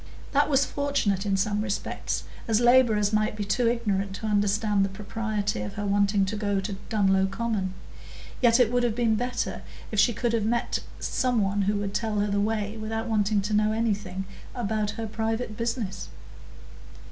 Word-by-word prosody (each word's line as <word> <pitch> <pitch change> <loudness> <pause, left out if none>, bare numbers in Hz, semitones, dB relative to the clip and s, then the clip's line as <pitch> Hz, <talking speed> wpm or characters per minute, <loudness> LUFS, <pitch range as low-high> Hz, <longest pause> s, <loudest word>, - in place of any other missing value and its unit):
That 290 +1 +3
was 275 -1 +4
fortunate 240 -9 0
in 195 -1 +2
some 205 +2 0
respects, 200 -2 -2 0.2
as 225 -1 +3
labourers 240 -4 +4
might 215 0 +1
be 210 - -3
too 235 +3 +2
ignorant 200 -5 -1
to 220 - -6
understand 205 0 +2
the 195 - 0
propriety 210 - -3
of 105 - -5
her 205 - -3
wanting 200 0 +2
to 200 +3 -3
go 205 -2 0
to 195 0 -4
Dunlow 195 -3 +3
Common; 195 -3 -2 0.7
yet 235 -1 +5
it 240 -3 +4
would 245 0 +2
have 240 -3 0
been 230 -2 +2
better 245 +3 -2 0.3
if 215 - 0
she 240 - +5
could 235 +1 -1
have 225 -2 +1
met 235 +2 0 0.2
some 250 -2 0
one 200 +1 0
who 200 +2 +1
would 200 -1 -2
tell 220 0 -1
her 205 0 0
the 200 - +1
way 210 0 -1
without 225 +1 -3
wanting 210 -2 +2
to 205 +2 -3
know 210 +1 +3
anything 205 -4 -1 0.3
about 215 -3 -1
her 225 - -3
private 220 +1 -2
business. 230 -5 -3
215 Hz, 180 wpm, -26 LUFS, 200-230 Hz, 0.7 s, yet